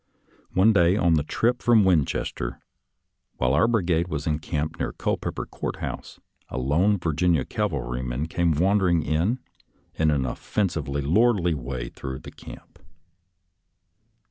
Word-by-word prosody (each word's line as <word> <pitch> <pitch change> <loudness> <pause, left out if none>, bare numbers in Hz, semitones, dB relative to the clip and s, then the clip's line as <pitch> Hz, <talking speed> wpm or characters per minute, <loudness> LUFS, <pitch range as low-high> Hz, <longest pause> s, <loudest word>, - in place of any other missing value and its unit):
One 105 +4 +5
day 90 0 +4
on 85 -4 +3
the 80 - +3
trip 120 +11 0
from 115 -3 +5
Winchester, 75 -8 0 0.8
while 65 +1 +1
our 90 +10 +4
brigade 90 -7 +1
was 75 -4 -4
encamped 75 -1 -2
near - - -2
Culpeper - - -3
Court - - -5
House, - - -7 0.3
a - - -5
lone 85 +11 +2
Virginia 80 -3 +1
cslv 105 -1 -1
alryman 65 -1 -3
came 85 0 +1
wandering 90 0 +2
in 80 - +1 0.6
an 75 -4 +2
offensively 70 - -2
lordly 90 - +3
way 60 -3 -5
through 65 +1 -6
the - - -11
camp. - - -13
80 Hz, 130 wpm, -25 LUFS, 70-95 Hz, 0.8 s, One